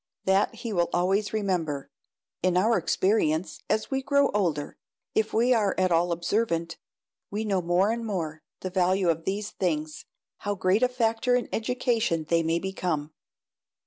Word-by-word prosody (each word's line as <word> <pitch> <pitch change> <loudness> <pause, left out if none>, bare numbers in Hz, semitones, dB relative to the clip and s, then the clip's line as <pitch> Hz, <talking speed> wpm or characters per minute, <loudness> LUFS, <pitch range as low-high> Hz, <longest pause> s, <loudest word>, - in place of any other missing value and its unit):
That 190 +1 +2
he 230 -3 -5
will 175 -2 +1
always 195 +4 +1
remember. 180 -9 -2 0.5
In 180 0 +2
our 220 +5 +3
experience, 180 -2 +1
as 215 +4 0
we 270 0 0
grow 280 +1 +3
older, 165 -8 -1 0.4
if 220 0 +1
we 240 +3 +3
are 210 -5 +2
at 185 -1 +2
all 170 +1 +3
observant, 170 -1 -1 0.5
we 215 +2 -3
know 195 -3 +1
more 175 +4 +2
and 230 0 -3
more 165 -8 -3 0.2
the 185 - -4
value 185 0 +2
of 165 0 0
these 205 +2 -2
things 155 -4 -2 0.3
how 205 0 -2
great 185 +3 +2
a 250 - +4
factor 240 0 +1
in 245 - 0
education 230 -7 0
they 170 0 +3
may 165 +1 +1
become! 170 -5 -2
190 Hz, 160 wpm, -27 LUFS, 170-220 Hz, 0.5 s, a